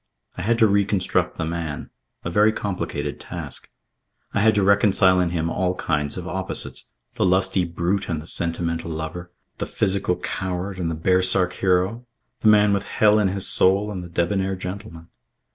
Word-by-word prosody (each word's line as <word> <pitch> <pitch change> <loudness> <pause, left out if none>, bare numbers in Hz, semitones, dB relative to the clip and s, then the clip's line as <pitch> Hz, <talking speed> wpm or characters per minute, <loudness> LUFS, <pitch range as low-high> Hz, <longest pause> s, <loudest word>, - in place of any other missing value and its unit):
I - - -5
had 115 +5 +1
to 115 - +5
reconstruct 100 -2 +1
the 80 - -2
man, 80 -2 -4 0.3
a 85 - -2
very 105 +4 +4
complicated 80 -9 -4
task. - - -7 0.6
I - - +1
had 110 +1 +4
to 100 - +2
reconcile 95 -2 +4
in 90 -1 +1
him 85 -1 -1
all 90 +1 -1
kinds 75 -3 -2
of 90 0 -6
opposites 95 +1 -3 0.3
the - - +1
lusty 95 0 +3
brute 85 +4 -2
and 80 -3 -1
the 75 - -10
sentimental 85 0 -2
lover; 80 +3 -6 0.3
the - - -3
physical 95 -3 0
coward 95 +1 -4
and 85 -2 -1
the 80 - -2
baresark 90 +2 +2
hero; 95 +6 +1 0.4
the - - +1
man 105 -1 +5
with 100 0 -1
hell 105 0 +3
in 105 - +3
his 95 0 0
soul 100 +3 +3
and 95 -3 -5
the 85 - -9
debonair 95 +3 0
gentleman. 90 -3 -8
95 Hz, 175 wpm, -23 LUFS, 85-100 Hz, 0.6 s, to